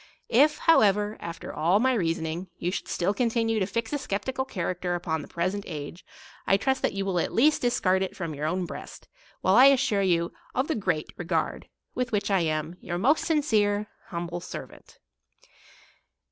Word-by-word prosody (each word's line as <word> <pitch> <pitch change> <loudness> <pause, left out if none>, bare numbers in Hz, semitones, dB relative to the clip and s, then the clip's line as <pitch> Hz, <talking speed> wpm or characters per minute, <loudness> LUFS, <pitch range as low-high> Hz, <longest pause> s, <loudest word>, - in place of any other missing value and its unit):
If, 290 +6 +4
however, 210 - +4
after 170 0 -7
all 170 +6 +2
my 260 +3 +3
reasoning, 165 -3 -1
you 175 - -2
should - - -4
still 185 +4 0
continue 225 -1 +1
to 190 - 0
fix 230 +4 -3
a 290 - 0
skeptical 260 +4 -2
character 180 -5 -2
upon 160 -3 -2
the - - -10
present 185 +4 -2
age, 150 +3 -7 0.4
I 195 - +5
trust 265 +6 0
that - - 0
you 195 0 -2
will 185 -3 0
at - - -1
least 295 +6 +3
discard 190 -6 +2
it 190 - -3
from 170 -4 -4
your 150 +1 -3
own 180 +2 -1
breast, - - -9 0.3
while 185 - +3
I 250 +5 +8
assure 250 -7 +4
you 170 -3 +1 0.2
of 260 +3 +1
the 320 - 0
great 175 - -2
re 175 - -5
gard 165 -2 -1 0.3
with 250 0 -2
which 205 -1 0
I 195 - +4
am 160 +1 -2
Your 175 0 -3
most 275 - +2
sincere, 215 -10 +1 0.2
humble 170 0 -4
servant. 175 - -10
195 Hz, 185 wpm, -27 LUFS, 170-230 Hz, 0.4 s, I